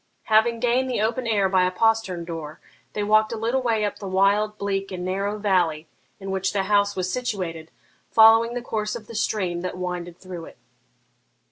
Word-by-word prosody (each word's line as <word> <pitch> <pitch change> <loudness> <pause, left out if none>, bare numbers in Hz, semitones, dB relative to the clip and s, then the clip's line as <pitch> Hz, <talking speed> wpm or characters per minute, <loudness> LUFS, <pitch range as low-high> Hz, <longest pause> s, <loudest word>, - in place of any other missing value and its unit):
Having 225 +1 +3
gained 250 +2 +1
the 250 - -1
open 230 +3 -1
air 205 -4 +2
by 185 -1 +3
a 180 - +2
postern 190 -3 0
door, 160 -3 -7 0.3
they 210 - -2
walked 215 +1 +3
a 230 - -3
little 235 +4 0
way 225 -4 +1
up 205 - -4
the 200 - -6
wild, 200 +3 +2
bleak, 195 -1 -2
and 180 -1 -5
narrow 200 +3 -2
valley 180 -7 +1 0.3
in 195 -1 -6
which 190 +1 -1
the 195 -1 +1
house 205 0 +2
was 185 0 -2
situated, 185 -10 -3 0.4
following 225 +1 +6
the 245 - -4
course 215 -2 -3
of 225 -2 -8
the 230 - -11
stream 185 -5 -1
that 180 0 -4
winded 180 -1 -5
through 180 -3 -8
it. - - -14
200 Hz, 195 wpm, -24 LUFS, 185-225 Hz, 0.4 s, following